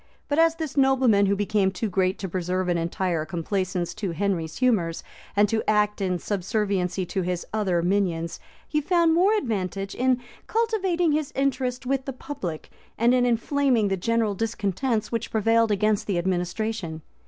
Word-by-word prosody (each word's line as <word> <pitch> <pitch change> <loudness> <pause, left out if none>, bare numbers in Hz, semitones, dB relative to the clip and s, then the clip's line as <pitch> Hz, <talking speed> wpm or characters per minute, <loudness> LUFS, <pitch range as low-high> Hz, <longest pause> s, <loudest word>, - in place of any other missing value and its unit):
But 290 +1 +1
as 330 0 +4
this 315 -4 -5
nobleman 260 -7 +4
was 200 - +2
become 205 -1 +2
too 190 +4 -3
great 185 -1 +1
to 195 - -4
preserve 180 +1 -2
an 175 - +2
entire 170 -1 -1
complaisance 175 +1 -2
to 200 -5 -3
Henry's 170 -3 -2
humors, 205 -10 +1 0.3
and 205 +1 +5
to 220 0 +1
act 210 -1 +2
in 185 -2 0
subserviency 190 -1 -1
to 190 +2 -2
his 180 -1 -2
other 190 -6 +1
minions, 175 -3 0 0.3
he 300 0 0
found 335 +1 +3
more 380 +6 +4
advantage 195 - -2
in 255 0 +2 0.3
cultivating 390 -7 +1
his 300 -1 -1
interest 260 -2 -1
with 265 0 -1
the 270 - -4
public, 190 - -6 0.3
and 235 +2 +4
in 250 -1 +3
inflaming 245 -2 +2
the 195 - +1
general 225 +2 0
discontents 220 +2 -1
which 230 -1 -2
prevailed 225 +1 +3
against 210 0 +1
the 195 -4 0
administration. 180 -1 -2
210 Hz, 165 wpm, -25 LUFS, 185-255 Hz, 0.3 s, and